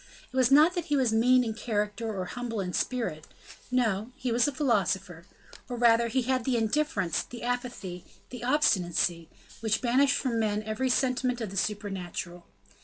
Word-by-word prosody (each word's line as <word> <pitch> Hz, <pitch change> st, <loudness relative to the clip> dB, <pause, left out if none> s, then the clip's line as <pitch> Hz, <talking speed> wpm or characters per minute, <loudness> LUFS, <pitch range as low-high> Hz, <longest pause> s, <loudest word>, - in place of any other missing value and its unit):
It -, -, -9 dB
was 255 Hz, -2 st, +4 dB
not 305 Hz, +5 st, +6 dB
that 350 Hz, -3 st, -3 dB
he 295 Hz, -, 0 dB
was 250 Hz, -4 st, +2 dB
mean 250 Hz, +3 st, +4 dB
in 225 Hz, -2 st, -2 dB
character 215 Hz, 0 st, -2 dB
or 190 Hz, -3 st, -3 dB
humble 240 Hz, 0 st, -4 dB
in 180 Hz, -2 st, -3 dB
spirit; 225 Hz, -12 st, -2 dB, 0.4 s
no, 230 Hz, -3 st, 0 dB
he 255 Hz, -2 st, -3 dB
was 235 Hz, +2 st, +3 dB
a -, -, 0 dB
philosopher, 195 Hz, -, -1 dB, 0.4 s
or 245 Hz, -, -4 dB
rather 235 Hz, 0 st, +4 dB
he 255 Hz, +2 st, 0 dB
had 255 Hz, 0 st, 0 dB
the 250 Hz, 0 st, +1 dB
indifference, 220 Hz, -, 0 dB
the 240 Hz, -1 st, -10 dB
apathy, 240 Hz, -8 st, -4 dB, 0.3 s
the 245 Hz, -2 st, -7 dB
obstinacy 180 Hz, -, +1 dB, 0.3 s
which 220 Hz, -1 st, 0 dB
banish 260 Hz, +3 st, +3 dB
from 240 Hz, -4 st, -1 dB
man 215 Hz, -1 st, 0 dB
every 220 Hz, +5 st, -1 dB
sentiment 255 Hz, -1 st, +1 dB
of 220 Hz, -5 st, -4 dB
the -, -, -8 dB
supernatural. 190 Hz, -4 st, -4 dB
230 Hz, 175 wpm, -28 LUFS, 205-255 Hz, 0.4 s, not